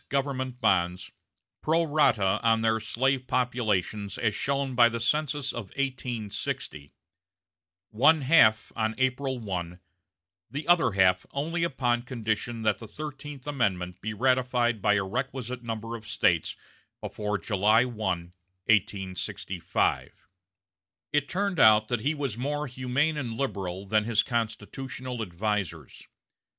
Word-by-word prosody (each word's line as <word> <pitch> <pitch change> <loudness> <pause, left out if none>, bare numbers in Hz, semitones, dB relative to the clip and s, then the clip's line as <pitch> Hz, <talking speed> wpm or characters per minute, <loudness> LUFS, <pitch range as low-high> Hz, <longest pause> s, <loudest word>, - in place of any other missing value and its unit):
government 130 -2 -2
bonds, 90 -5 +1 0.5
pro 165 +2 +2
rata 115 -11 +3
on 115 -1 +3
their 110 0 +2
slave 130 +3 0
populations 110 -5 -1
as 110 -2 +1
shown 135 +3 -1
by 120 -1 +6
the 115 0 -4
census 145 +2 0
of 120 - -5
1860 120 - -4 1.0
one 145 +8 +5
half 120 -7 +5
on 110 0 -1
April 130 0 0
1, 90 -5 -5 0.7
the 145 +2 -5
other 175 - +4
half 90 -1 +3
only 165 +5 -2
upon 120 -7 +1
condition 115 -1 -3
that 110 -2 +1
the 115 - -9
Thirteenth 145 0 -8
Amendment 95 -11 -1
be 110 - -3
ratified 125 -1 +1
by 105 +1 +4
a 105 - +1
requisite 125 +4 -4
number 115 0 -5
of 110 -2 -10
States 85 -5 +1 0.4
before 105 -1 -3
July 105 +5 +3
1, 120 -3 -7 0.7
1865. 95 -4 -1 0.9
It 145 -1 +1
turned 195 -2 -1
out 110 -2 +6
that 120 -3 0
he 145 +6 0
was 135 -6 -3
more 145 +3 -1
humane 130 +4 0
and 120 -6 -3
liberal 100 -7 -3
than 105 +1 +2
his 115 -2 +3
constitutional 120 +2 -4
advisers. 95 - -3
120 Hz, 125 wpm, -27 LUFS, 105-135 Hz, 1.0 s, by